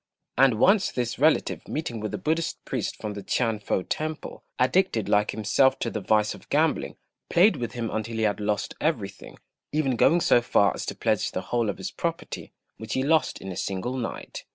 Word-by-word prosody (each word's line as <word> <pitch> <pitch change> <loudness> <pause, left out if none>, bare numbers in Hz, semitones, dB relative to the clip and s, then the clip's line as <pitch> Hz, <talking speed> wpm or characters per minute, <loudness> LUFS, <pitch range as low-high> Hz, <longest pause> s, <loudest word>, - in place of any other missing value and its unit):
And 130 -1 +5
once 195 - +4
this 125 0 -2
relative, 155 +3 +2
meeting 145 -7 -3
with 105 -1 -4
a - - -3
Buddhist 160 +1 -2
priest - - -2
from 105 -1 -5
the 100 - -6
T'ien 115 0 0
fo 95 -2 -1
temple, 155 +7 -4
addicted 130 - +2
like 105 +1 +3
himself 130 +5 +2
to 115 - -2
the 110 - -3
vice 105 +2 +2
of - - -15
gambling, - - +1 0.3
played 195 +6 +5
with 120 -1 -4
him 115 -2 -3
until 110 +1 -3
he 110 - 0
had 105 -1 +1
lost 105 0 -1
everything, 115 -11 -3 0.3
even 145 -4 +1
going 165 +9 +4
so 120 - +4
far 100 -4 +3
as - - -6
to - - -3
pledge - - 0
the - - -2
whole 120 -3 -1
of 100 - -3
his - - -5
property, - - -4 0.3
which 110 -1 -6
he 130 - +1
lost 155 +2 +2
in 95 - -6
a - - -6
single 100 +8 -3
night. 120 -3 -5
120 Hz, 200 wpm, -26 LUFS, 105-145 Hz, 0.3 s, And